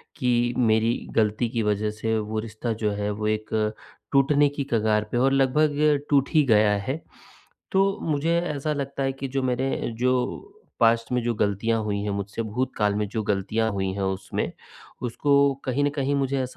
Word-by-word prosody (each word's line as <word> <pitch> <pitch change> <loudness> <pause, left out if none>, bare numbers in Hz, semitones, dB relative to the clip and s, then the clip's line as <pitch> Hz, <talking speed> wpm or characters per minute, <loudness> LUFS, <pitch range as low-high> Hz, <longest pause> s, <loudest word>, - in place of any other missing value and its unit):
कि 120 -1 +1
मेरी 115 0 +3 0.2
ग़लती 110 +2 +1
की 115 -1 -1
वजह 105 0 0
से 110 0 +1
वो 110 0 -2
रिश्ता 110 +1 -4
जो 105 - +2
है 105 0 -2
वो 105 +1 -3
एक, 110 0 -1 0.4
टूटने 145 +1 +4
की 145 0 -4
कगार 110 -1 +2
पे - - 0
और 135 +2 +3
लगभग 145 +2 +2
टूट 140 -2 +3
ही 155 -2 +5
गया 105 0 +4 0.2
है। 145 +5 -2 0.7
तो 195 +1 +2
मुझे 160 +2 +1
ऐसा 150 -3 -2
लगता 140 -1 -3
है 135 - +1
कि 135 0 -5
जो 135 - +1
मेरे 130 0 -1
जो 125 - -1 0.2
पास्ट 115 0 +3
में 125 0 +1
जो 120 0 0
ग़लतियाँ 105 +2 0
हुई 105 -1 -1
हैं, 105 - -2
मुझसे 100 +2 -3
भूतकाल 110 -2 -1
में 105 0 -1
जो 110 +2 -3
ग़लतियाँ 105 +3 0
हुई 95 -1 -1
हैं 100 - -4
उसमें, 95 0 -2 0.5
उसको 125 +4 0 0.3
कहीं 130 +2 0
न 145 - +3
कहीं 140 0 0
मुझे 140 -1 0
ऐसा 130 - 0
120 Hz, 185 wpm, -25 LUFS, 105-140 Hz, 0.7 s, ही